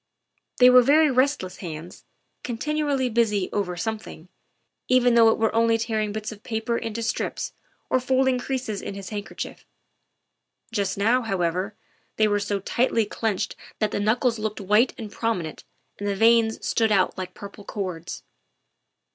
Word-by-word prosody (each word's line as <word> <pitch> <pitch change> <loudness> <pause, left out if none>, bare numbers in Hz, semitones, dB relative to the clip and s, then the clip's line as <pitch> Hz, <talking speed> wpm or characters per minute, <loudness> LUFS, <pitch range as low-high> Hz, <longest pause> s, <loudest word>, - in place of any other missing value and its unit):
They 250 0 +8
were 250 0 +8
very 295 +4 +5
rest 265 0 +2
less 185 - -8
hands, 165 -1 -8 0.4
continually 280 +2 -1
busy 220 -5 +1
over 180 -4 -1
something, 215 -5 -5 0.6
even 250 -1 +4
though 230 -1 +7
it - - +2
were 225 -1 +1
only 230 0 +3
tearing 220 -2 -1
bits 215 +1 -4
of 210 -2 -11
paper 225 +1 -2
into 230 0 -3
strips 225 - -2 0.3
or 255 - +2
folding 260 0 +2
creases 245 -5 -3
in 195 - -6
his 200 -1 -7
handkerchief. 205 -2 -6 1.1
Just 200 -4 -1
now, 230 +6 +3
however, 190 -1 -1 0.4
they 215 - +3
were 205 0 +1
so 205 0 -1
tightly 230 +2 +1
clinched 210 -1 -2 0.2
that 215 -1 0
the - - -1
knuckles 230 +3 +1
looked 215 0 -3
white 210 +5 +3
and 220 -4 -7
prominent 215 -9 -3 0.3
and 205 - -3
the 200 - 0
veins 225 +1 +3
stood 225 -2 +2
out 195 -3 +3
like 185 -1 -6
purple 200 0 -10
cords. 180 -5 -5
220 Hz, 155 wpm, -25 LUFS, 200-240 Hz, 1.1 s, They